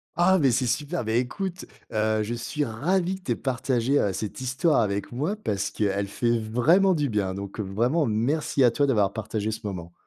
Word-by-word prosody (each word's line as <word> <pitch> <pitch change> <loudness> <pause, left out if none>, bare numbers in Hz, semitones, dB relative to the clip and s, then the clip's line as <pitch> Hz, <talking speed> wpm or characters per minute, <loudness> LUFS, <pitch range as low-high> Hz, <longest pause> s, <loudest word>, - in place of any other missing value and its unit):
Ah, 185 +2 +4
mais, 135 -4 +4
c'est 125 +2 +1
super! 150 +7 -1
Beh, 110 +2 +2
écoute, 185 +9 -4 0.3
heu, 110 0 +1
je 115 +3 -3
suis 145 +5 -2
ravi 175 +11 0
que - - -27
tu 120 - -1
aies - - -5
partagé, 130 0 0
heu, 100 - +1
cette 105 +5 -5
histoire 130 +3 +2
avec 100 0 -2
moi, 150 - -1
parce 100 - -2
qu'elle 100 -1 -1
fait 120 +3 0
vraiment 150 - +3
du 145 -2 0
bien. 100 -3 -1
Donc, 100 +2 -7
heu, - - 0
vraiment, 120 - +1
merci 135 +6 +1
à 120 - +6
toi 145 +3 +1
d'avoir 105 -7 +2
partagé 110 0 -3
ce 110 - -5
moment. 85 -4 -6
120 Hz, 210 wpm, -25 LUFS, 105-150 Hz, 0.3 s, à